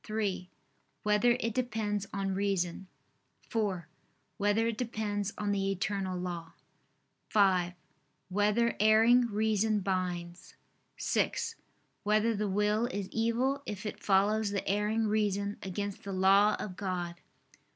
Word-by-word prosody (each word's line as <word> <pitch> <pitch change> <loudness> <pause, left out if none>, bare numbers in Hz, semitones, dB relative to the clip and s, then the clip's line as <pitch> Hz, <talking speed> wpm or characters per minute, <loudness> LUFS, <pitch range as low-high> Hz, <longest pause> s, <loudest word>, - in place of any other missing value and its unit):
(3) 205 -4 -2 0.5
Whether 210 +3 +3
it 230 -3 -1
depends 215 -5 -1
on 195 -1 -2
reason? 190 -2 -1 0.6
(4) 200 -8 -1 0.5
Whether 205 +2 +2
it 230 -2 -1
depends 210 -4 -2
on 205 -1 -1
the 195 -1 0
eternal 195 -1 -2
law? 175 -2 -5 0.8
(5) 185 -4 +3 0.6
Whether 210 +4 +2
erring 225 +3 +5
reason 215 -1 +1
binds? 180 -2 -3 0.4
(6) - - 0 0.5
Whether 215 +2 +2
the 205 0 -1
will 210 +4 +1
is 205 -6 -4
evil 240 +5 0
if 210 0 -5
it 210 - -5
follows 205 +2 +3
the 200 -1 -3
erring 210 +3 +1
reason 205 -1 0
against 200 +1 -4
the 200 - -6
law 195 +3 +5
of 185 -3 -5
God? 180 -3 -4
205 Hz, 120 wpm, -31 LUFS, 190-220 Hz, 0.8 s, erring